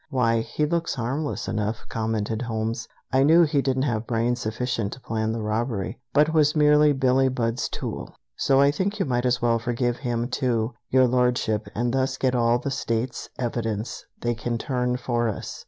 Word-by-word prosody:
"Why, 115 -5 +2
he 115 +6 -1
looks 170 0 -1
harmless 120 -2 -2
enough," 110 0 -2
commented 110 0 -2
Holmes; 115 0 -3 0.3
"I 130 - +4
knew 160 +5 +6
he 150 -3 +2
didn't 130 -1 0
have 115 -4 -1
brains 120 +1 0
sufficient 110 -2 -2
to - - -10
plan 110 -2 -2
the 115 -1 -3
robbery, 110 0 -2
but 150 +4 +3
was 150 -1 +3
merely 150 0 +5
Billie 135 -1 +3
Budd's 120 -2 -1
tool. - - -6 0.2
So 135 0 +3
I 140 +1 +5
think 195 +7 -2
you 195 - 0
might 125 -2 0
as 125 0 0
well 115 -1 +3
forgive 120 +1 -1
him, 120 -2 -2
too, 120 -2 0 0.2
Your 130 0 +5
Lordship, 125 -3 +1
and 120 +2 0
thus 135 0 0
get 130 -2 +1
all 120 -1 +3
the 135 +3 -4
states' 120 0 -2
evidence 115 -3 -3 0.2
they 120 0 0
can 115 +1 -3
turn 125 0 -1
for 120 -2 0
us. 105 - -6
120 Hz, 185 wpm, -25 LUFS, 115-135 Hz, 0.3 s, knew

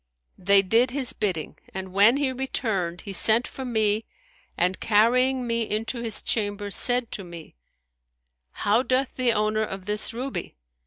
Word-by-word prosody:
They 195 +1 +4
did 230 +6 +2
his 260 -1 -3
bidding, 185 -8 -3 0.2
and 190 -1 -6
when 210 +6 +5
he 280 -2 0
returned, 215 -9 -3
he 200 - -8
sent 225 +5 +4
for 265 - -8
me 220 -2 0 0.5
and 180 +2 0
carrying 250 +4 +2
me 230 -1 -2
into 225 +3 -3
his 225 -3 +2
chamber 205 -2 -1
said 245 +2 +4
to 195 - -5
me, 170 -3 -11 1.0
How 210 - 0
doth 260 +1 -1
the 250 -2 +2
owner 215 0 0
of 195 -3 -5
this 210 +1 -2
ruby?' 250 - -6
220 Hz, 155 wpm, -24 LUFS, 200-245 Hz, 1.0 s, when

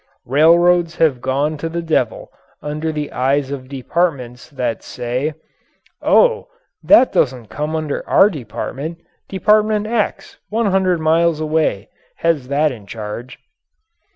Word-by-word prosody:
Railroads 170 +5 +4
have 145 -8 +2
gone 140 +4 -1
to 165 +3 -4
the 170 +1 -4
devil 130 -8 -1 0.3
under 155 +2 -3
the 150 -1 -4
eyes 135 +2 0
of 130 -2 -6
departments 135 -3 -2
that 125 -6 -3
say: 130 +6 -3 0.7
"Oh, 475 -2 +3 0.3
that 275 -4 +5
doesn't 125 -5 0
come 150 +8 -3
under 155 -2 -3
our 205 - +5
department. 145 - -6 0.3
Department 210 +2 +2
X, 220 -1 -2
100 190 -5 +1
miles 160 0 +2
away, 155 -9 0 0.3
has 160 -6 0
that 145 +2 +1
in 110 -5 -11
charge." 110 +4 -7
155 Hz, 125 wpm, -18 LUFS, 130-170 Hz, 0.7 s, that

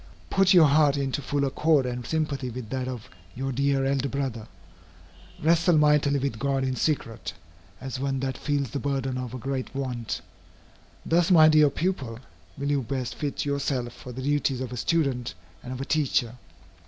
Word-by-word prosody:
Put 195 -1 +4
your 175 -4 +8
heart 145 0 +4
into 140 0 -1
full 140 +1 0
accord 145 +1 +2
and 125 -1 -4
sympathy 145 -5 -1
with 120 -2 -7
that 130 -1 -2
of 125 -4 -6 0.3
your 135 +2 -3
dear 135 +1 +1
elder 135 0 0
Brother. 130 -5 -3 1.0
Wrestle 170 +1 +4
mightily 150 -1 +4
with 135 -5 -2
God 135 0 0
in 130 -1 -1
secret, 120 -5 -2 0.5
as 130 -1 -5
one 135 0 -1
that 130 -1 -2
feels 140 -2 -1
the 140 - -2
burden 135 -2 -2
of 125 -1 -5
a - - -4
great 135 +1 -4
want. 125 -4 -3 0.8
Thus, 170 +1 +3
my 160 -4 +8
dear 155 -1 +6
pupil, 140 -7 -2 0.4
will 140 +1 -1
you 140 -1 +2
best 130 -1 -3
fit 145 -1 -3
yourself 140 -4 -1
for 125 - -10
the 130 +2 -6
duties 145 -2 +1
of 130 -2 -4
a 125 - -5
student 135 -4 0 0.3
and 125 - -8
of 130 - -5
a 135 - -3
teacher. 135 -6 +1
135 Hz, 180 wpm, -26 LUFS, 130-145 Hz, 1.0 s, your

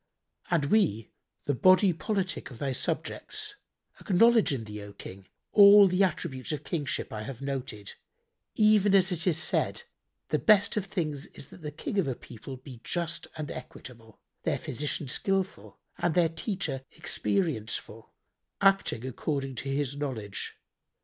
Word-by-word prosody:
And 170 -5 +2
we, 140 - +2 0.3
the 145 - 0
body 185 - +5
politic 195 +1 -2
of 125 - -11
thy 135 +3 -2
subjects, 425 - -3 0.5
acknowledge 225 0 +4
in 130 -5 -2
thee, 105 -1 -7
O 100 0 -10
King, 95 -1 -10 0.2
all 205 -1 +9
the 185 +1 +1
attributes 135 -7 -2
of 150 -1 -3
kingship 150 -9 -3
I 105 - -4
have 120 +2 -7
noted, 130 -7 -5 0.6
even 210 -2 +5
as 190 0 +4
it 170 0 -3
is 165 -4 +3
said, 160 - +1 0.5
'The - - +1
best 205 -2 +4
of 210 -3 -1
things 150 -8 -3
is - - -10
that - - -14
the 150 - -4
King 180 +7 -3
of 175 - +1
a 130 - -1
people 125 +3 -10
be 125 -2 -12
just 170 -1 -2
and 155 -2 -4
equitable, 115 -3 -11 0.2
their - - 0
physician 145 +2 -3
skilful 195 +7 -1 0.2
and 170 -2 +1
their 170 -2 +4
teacher 165 - -3
experience 160 - 0
full, - - -9 0.5
acting 195 - +3
according 135 +1 -3
to 135 - -4
his 140 0 -1
knowledge.' 125 -9 -4
155 Hz, 155 wpm, -29 LUFS, 130-190 Hz, 0.6 s, all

